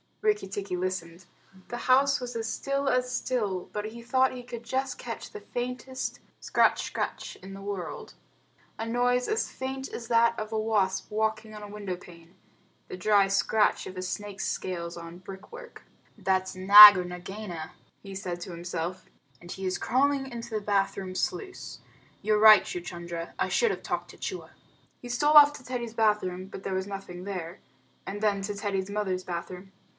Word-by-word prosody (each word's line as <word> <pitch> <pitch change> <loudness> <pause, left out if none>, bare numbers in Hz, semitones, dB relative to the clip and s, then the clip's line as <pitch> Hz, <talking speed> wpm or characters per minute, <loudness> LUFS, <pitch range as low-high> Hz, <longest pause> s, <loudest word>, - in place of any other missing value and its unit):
Rikki 425 -1 +1
tikki 195 -1 -4
listened. 180 -1 -4 0.4
The 240 - -4
house 275 +3 +3
was 245 -1 -6
as 225 -1 -2
still 275 +4 -2
as 250 -1 +1
still, 205 -10 -2
but 210 0 -4
he 230 +2 -7
thought 260 +2 +3
he 250 -1 -8
could 240 -1 -8
just 260 +3 -2
catch - - -7
the 425 - -8
faintest 250 0 -4 0.2
scratch - - +2
scratch - - -4
in 190 +1 -11
the 195 - -9
world 195 -3 -6 0.7
a 225 - -2
noise 245 +1 +1
as 440 +1 0
faint 265 +1 -5
as 230 - -7
that 235 0 +3
of 215 0 -5
a 220 - 0
wasp 200 -4 0
walking 220 0 -1
on 210 - -9
a - - -7
window 200 -3 -5
pane 175 0 -15 0.5
the - - -7
dry 200 +1 +4
scratch 205 +2 +2
of 185 - -8
a - - -3
snake's 200 +1 -4
scales 170 -2 -3
on 170 +1 -9
brick 190 - -11
work. 480 0 -11 0.3
"That's 190 0 0
Nag 205 +2 +11
or 180 - 0
Nagaina," 180 -2 -7 0.3
he 195 -1 -9
said 180 -2 -5
to 180 - -6
himself, 175 +1 -5 0.3
"and 175 0 -11
he 190 - -5
is 185 - 0
crawling 270 +2 +1
into 235 0 -7
the 215 -1 -1
bath 200 -1 +1
room 190 -1 -5
sluice. 375 - -4 0.4
You're 210 0 +2
right, 215 -1 +9
Chuchundra; 170 -1 -6
I - - 0
should 470 -2 +2
have - - -5
talked - - -3
to - - -16
Chua." 370 - -6 0.5
He 245 - -9
stole 295 +5 +2
off 290 -1 +9
to 275 - -11
Teddy's 240 -3 -4
bath 215 -2 +2
room, 185 0 -4
but 195 0 -10
there 190 - -2
was 190 +1 -2
nothing 195 -3 -7
there, 180 -3 -5 0.5
and 205 +1 -5
then 205 -2 +1
to 205 +1 -3
Teddy's 200 -2 -2
mother's 195 -3 -2
bathroom. 180 +2 -6
205 Hz, 185 wpm, -28 LUFS, 185-240 Hz, 0.7 s, Nag